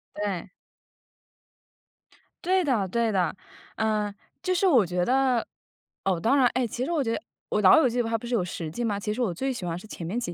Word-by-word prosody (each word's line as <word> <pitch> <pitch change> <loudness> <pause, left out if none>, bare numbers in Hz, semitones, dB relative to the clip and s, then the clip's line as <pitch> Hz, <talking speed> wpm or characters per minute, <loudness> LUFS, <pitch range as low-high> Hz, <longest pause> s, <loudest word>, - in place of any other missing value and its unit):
对。 200 -3 -3 1.9
对 375 +2 +3
的， 255 - +1
对 230 +3 +1
的， 185 -6 +1 0.4
呃， 215 -2 0 0.3
就 370 - 0
是 370 +2 +2
我 255 - +5
觉 180 0 -1
得， 255 -1 +2 0.6
哦， 190 -3 +1
当 230 +10 +3
然 270 -3 +5
哎， 255 -1 +1
其 240 +3 -4
实 275 - -2
我 325 -4 +1
觉 245 - -1
得 - - 0 0.3
哦， - - 0
《老 185 - +8
友 275 - +4
记》 245 0 0
它 225 0 0
不 235 - -8
是 245 - -3
有 225 - +2
10 170 -2 -5
季 240 +10 -4
吗？ 205 -3 -1
其 210 +1 -2
实 245 - -3
我 215 -8 0
最 265 +10 -2
喜 240 -7 -6
欢 170 0 -3
是 215 - -13
前 175 - -7
面 200 +9 -2
几 175 -8 -4
225 Hz, 230 characters per minute, -26 LUFS, 190-255 Hz, 1.9 s, 老